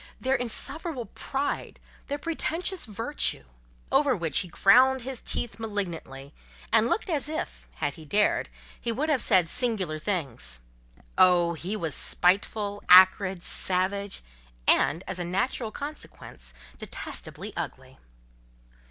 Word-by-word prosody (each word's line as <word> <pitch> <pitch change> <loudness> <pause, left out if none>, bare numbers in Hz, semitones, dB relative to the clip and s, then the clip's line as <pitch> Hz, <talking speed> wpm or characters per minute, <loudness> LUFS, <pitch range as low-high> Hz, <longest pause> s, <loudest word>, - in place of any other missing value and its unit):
their 260 +1 0
insufferable 260 +3 0
pride, 275 +5 -4 0.3
their 285 - -2
pretentious 330 +2 -2
virtue: 225 - -2 0.5
over 270 -1 +3
which 165 -3 +1
he 185 - -2
ground 255 +9 +4
his 260 -1 -5
teeth 235 - -2
malignantly, 170 -10 -5 0.4
and 225 0 +5
looked 435 - -1
as 300 -5 -1
if, 315 - -5
had - - -2
he 160 - -12
dared, 205 +8 +2 0.3
he 235 - -2
would 285 +7 -1
have 280 -5 +3
said 185 -5 +4
singular 195 -8 -1
things. 150 - -3 0.6
Oh! 175 -2 +5
he 175 +6 -4
was 165 -8 -2
spiteful, 205 +5 +1
acrid, 185 0 +7
savage; 190 - -2 0.4
and, 165 +5 +4
as 190 -1 -4
a - - -1
natural 195 +6 -1
consequence, 215 - -8 0.2
detestably - - -5
ugly. - - -7
205 Hz, 125 wpm, -27 LUFS, 180-260 Hz, 0.6 s, acrid